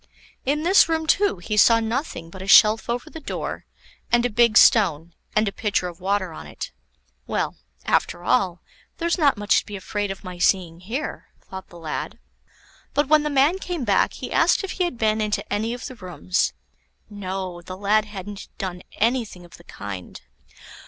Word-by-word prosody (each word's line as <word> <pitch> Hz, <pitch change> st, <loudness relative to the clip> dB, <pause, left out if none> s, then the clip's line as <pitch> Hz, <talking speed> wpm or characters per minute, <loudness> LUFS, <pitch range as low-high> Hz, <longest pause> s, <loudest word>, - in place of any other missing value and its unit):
In 300 Hz, +3 st, +1 dB
this 365 Hz, 0 st, +5 dB
room, 320 Hz, -1 st, 0 dB
too, 400 Hz, -, +2 dB
he 210 Hz, +5 st, -4 dB
saw 230 Hz, +2 st, +6 dB
nothing 225 Hz, -, -3 dB
but 190 Hz, -, -10 dB
a 190 Hz, -, -7 dB
shelf 215 Hz, +3 st, +6 dB
over 245 Hz, +5 st, -2 dB
the 320 Hz, -, -9 dB
door, 305 Hz, -, -5 dB, 0.5 s
and 240 Hz, 0 st, +4 dB
a 245 Hz, -, 0 dB
big 235 Hz, 0 st, +4 dB
stone, 170 Hz, -, +5 dB, 0.2 s
and 215 Hz, 0 st, +3 dB
a -, -, 0 dB
pitcher 200 Hz, -3 st, -1 dB
of 175 Hz, 0 st, -9 dB
water 190 Hz, -2 st, -1 dB
on -, -, -9 dB
it. -, -, -7 dB, 0.6 s
Well, -, -, -2 dB, 0.3 s
after 175 Hz, -, 0 dB
all, 175 Hz, -1 st, +1 dB, 0.4 s
there's 340 Hz, +1 st, 0 dB
not 285 Hz, -7 st, +4 dB
much 205 Hz, 0 st, +3 dB
to -, -, -9 dB
be 205 Hz, -, -6 dB
afraid 205 Hz, +1 st, -3 dB
of 195 Hz, +1 st, -6 dB
my 180 Hz, -2 st, -8 dB
seeing 175 Hz, -3 st, +1 dB
here, 230 Hz, +11 st, -5 dB
thought 190 Hz, 0 st, -9 dB
the 175 Hz, -, -13 dB
lad. 160 Hz, -2 st, -5 dB, 0.8 s
But 290 Hz, -1 st, +2 dB
when 310 Hz, -1 st, +6 dB
the 300 Hz, -, -1 dB
man 290 Hz, +6 st, +3 dB
came 350 Hz, -7 st, -4 dB
back, 205 Hz, -4 st, +2 dB
he -, -, -7 dB
asked -, -, +3 dB
if 390 Hz, -, -4 dB
he 365 Hz, -, 0 dB
had 345 Hz, -8 st, -4 dB
been 220 Hz, -1 st, +1 dB
into 210 Hz, -1 st, -1 dB
any 220 Hz, +3 st, -1 dB
of 245 Hz, +1 st, -6 dB
the -, -, -6 dB
rooms. 185 Hz, -4 st, -1 dB, 0.5 s
No, 190 Hz, -3 st, -5 dB
the 185 Hz, +2 st, -8 dB
lad 210 Hz, +2 st, +2 dB
hadn't 205 Hz, -1 st, -8 dB
done 180 Hz, -2 st, -4 dB, 0.2 s
anything 225 Hz, -6 st, 0 dB
of 175 Hz, -, -15 dB
the 170 Hz, -, -17 dB
kind. 100 Hz, -3 st, -8 dB
210 Hz, 190 wpm, -23 LUFS, 185-250 Hz, 0.8 s, saw